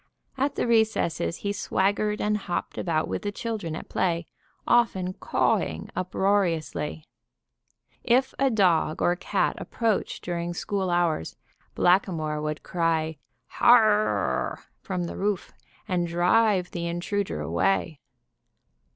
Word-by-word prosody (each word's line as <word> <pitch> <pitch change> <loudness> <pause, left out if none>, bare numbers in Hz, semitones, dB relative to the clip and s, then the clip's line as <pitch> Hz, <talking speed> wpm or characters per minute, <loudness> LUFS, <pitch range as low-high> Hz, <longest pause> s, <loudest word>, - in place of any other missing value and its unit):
At 275 +2 0
the - - 0
recesses 220 -7 +1
he 200 - 0
swaggered 205 +2 0
and 210 0 +1
hopped 195 -4 -3
about 160 -3 0
with - - -3
the 205 - -3
children 205 -8 -4
at - - -7
play, 170 -2 0 0.4
often 190 -6 +2
cawing 80 - 0
uproariously. 180 -5 0 1.0
If 255 +2 +2
a 275 0 +4
dog 180 -8 +2
or 175 - +3
cat 180 - -1
approached 225 -3 -1
during 175 0 -3
school 195 0 -2
hours, 170 - 0 0.4
Blackamoor 165 -5 +2
would 150 0 -3
cry, 160 -3 0 0.3
"Har 240 -1 +6
r 215 0 +3
r!" - - -1 0.2
from 185 -3 -3
the 170 - -5
roof, 200 -2 -1 0.4
and 175 -2 0
drive 180 +2 +2
the 170 -1 -3
intruder 185 +4 -2
away. 170 -6 0
185 Hz, 125 wpm, -26 LUFS, 170-210 Hz, 1.0 s, Har